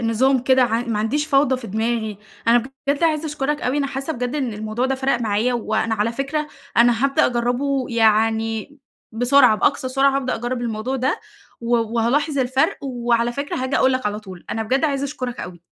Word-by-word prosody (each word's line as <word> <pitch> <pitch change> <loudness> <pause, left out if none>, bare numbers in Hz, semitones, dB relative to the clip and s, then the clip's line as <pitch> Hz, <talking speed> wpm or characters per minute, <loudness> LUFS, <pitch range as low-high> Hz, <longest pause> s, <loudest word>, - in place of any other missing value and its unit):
نظام 245 +4 +2
كده 260 0 +4
ع 230 -1 +1
ما 230 -3 -2
عنديش 285 +8 0
فوضى 275 -3 +3
في 255 - -8
دماغي، 220 0 -2 0.3
أنا 240 +1 +6 0.3
بجد 280 +3 +1
عايزة 315 -1 +1
أشكرك 295 0 -2
أوي، 255 +4 0
أنا 280 - 0
حاسة 275 +3 -4
بجد 250 +1 -3
إن 265 -6 -1
الموضوع 215 +4 -2
ده 270 - 0
فرَق 265 -2 0
معايا، 225 +3 0
وأنا 225 -1 -1
على 220 +2 0
فكرة 295 +4 -2 0.3
أنا 235 +1 +4
هابدأ 275 0 +3
أجرّبه 250 +3 0
يعني 225 +2 +1 0.3
بسرعة، 245 +1 +5
بأقصى 260 +1 +1
سرعة 270 +1 +2
هابدأ 260 -2 -1
أجرّب 240 +1 -3
الموضوع 235 +3 -2
ده، 255 +1 -1 0.4
و 235 +1 +1
وهالاحظ 235 +6 0
الفرق، 260 +1 +1
وعلى 240 -2 0
فكرة 280 +3 -4
هاجي 260 +1 -1
أقول 260 - +3
لك 255 -4 -1
على 210 +1 -2
طول، 185 -4 -11
أنا 225 - -2
بجد 265 +7 0
عايزة 280 -2 0
أشكرك 255 -3 -5
أوي. 175 -1 -8
245 Hz, 190 wpm, -21 LUFS, 225-275 Hz, 0.4 s, أنا